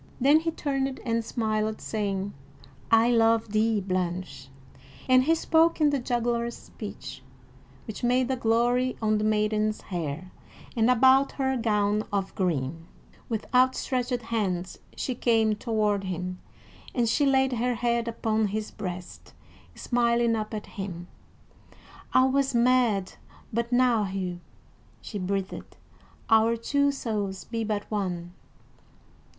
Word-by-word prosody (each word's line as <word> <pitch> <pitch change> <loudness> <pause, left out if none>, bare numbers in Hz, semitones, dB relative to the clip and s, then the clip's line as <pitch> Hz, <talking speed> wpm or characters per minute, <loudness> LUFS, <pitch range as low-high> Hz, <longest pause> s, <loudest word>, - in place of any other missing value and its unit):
Then 285 +4 +5
he 330 +1 -1
turned 275 -4 -2
and 230 -1 0
smiled, 220 -1 -1
saying: 200 -2 -3 0.6
"I 225 +2 +5
love 225 -1 +3
thee, 215 0 +2
Blanche," 180 -6 -3 0.6
and 255 0 +5
he 325 +2 +4
spoke 325 +1 +3
in 300 -2 +4
the 280 - 0
juggler's 235 -1 -1
speech, - - -9 0.6
which 220 0 -7
made 250 +1 +2
a - - +1
glory 245 +2 +1
on 215 -1 +1
the - - -1
maiden's 215 0 +1
hair, 175 0 -5 0.4
and 225 0 +3
about 260 +3 +5
her 265 -1 0
gown 210 -3 +1
of 195 -1 -2
green. 165 -3 -2 0.4
With 220 -2 -2
outstretched 250 -1 +1
hands 190 -6 -2 0.2
she 255 - -2
came 225 -3 +2
toward 210 -3 0
him, 180 0 -4 0.6
and 240 -3 +2
she 280 +5 +2
laid 265 -1 +3
her 245 +1 0
head 235 0 0
upon 220 -1 0
his 215 +2 -4
breast, 180 -3 -7 0.4
smiling 235 -1 +1
up 215 -1 -3
at 215 -2 -5
him. 180 -3 -7 1.0
"I 255 - +5
was 270 0 +1
mad 235 -5 +2 0.4
but 235 +2 -1
now, 245 -3 +3
Hugh," 185 -2 -4 0.6
she 205 - -6
breathed. 195 +1 -4 0.5
"Our 225 +1 +4
two 280 +4 +1
souls 205 -8 -3
be 225 -1 -3
but 210 -1 -2
one." 180 -4 -3
225 Hz, 130 wpm, -27 LUFS, 200-245 Hz, 1.0 s, Then